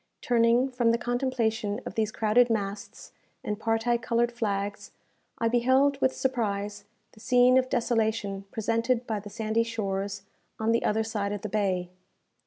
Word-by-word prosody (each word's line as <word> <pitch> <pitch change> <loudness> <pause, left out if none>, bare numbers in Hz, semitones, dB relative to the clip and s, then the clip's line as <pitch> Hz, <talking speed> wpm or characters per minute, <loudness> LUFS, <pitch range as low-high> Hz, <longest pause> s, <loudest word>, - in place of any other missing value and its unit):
Turning 235 +1 +3
from 240 -2 +1
the 230 - +3
contemplation 240 -4 -1
of - - -6
these 220 -1 0
crowded 225 +3 +3
masts, 200 -2 -4 0.3
and 210 0 -3
parti 225 +2 +1
coloured 235 +1 0
flags, 205 -3 -3 0.5
I 230 - +1
beheld 260 +4 +3
with 260 - +2
surprise 205 -5 -2 0.3
the - - -19
scene 250 +2 +4
of 260 0 +3
desolation 220 -5 0
presented 230 +2 0
by 220 -3 -2
the 205 +1 -10
sandy 220 +1 0
shores 200 -3 -3 0.4
on 220 +1 +1
the 230 - +1
other 220 +1 +1
side 205 -2 -2
of 205 - -5
the 215 - -3
bay. 185 -4 -1
225 Hz, 155 wpm, -27 LUFS, 205-240 Hz, 0.5 s, scene